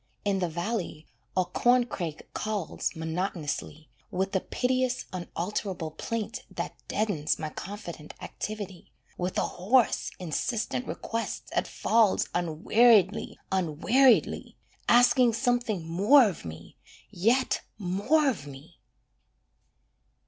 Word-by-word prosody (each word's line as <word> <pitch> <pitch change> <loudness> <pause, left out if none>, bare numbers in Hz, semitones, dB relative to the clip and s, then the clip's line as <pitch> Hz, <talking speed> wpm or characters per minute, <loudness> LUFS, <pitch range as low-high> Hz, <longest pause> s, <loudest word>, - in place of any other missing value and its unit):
In 200 -1 +1
the 180 -2 0
valley, 170 -2 -3 0.3
a 185 - +3
corncrake 220 -5 +1
calls 210 -5 -2
Monotonously, 160 -2 -3 0.2
With 190 +2 -2
a - - +4
piteous, 255 +3 0
unalterable 180 -1 -3
plaint, 220 +7 -4
that - - -4
deadens 180 -9 0
My 155 - -4
confident 175 -6 -8
activity: 205 -4 -6 0.2
With 180 +1 -3
a - - +2
hoarse, 225 +7 +2
insistent 220 - -2
request 230 0 -4
that - - 0
falls 225 -3 +2
Unweariedly, 195 +5 +3
unweariedly, 190 - +3 0.3
Asking 245 0 +6
something 235 -7 0
more 210 - +6
of 180 - -5
me, 80 -1 -9 0.3
Yet 235 +8 +2 0.2
more 205 - +2
of 190 - -1
me! 140 +4 -12
195 Hz, 105 wpm, -28 LUFS, 170-235 Hz, 0.3 s, Asking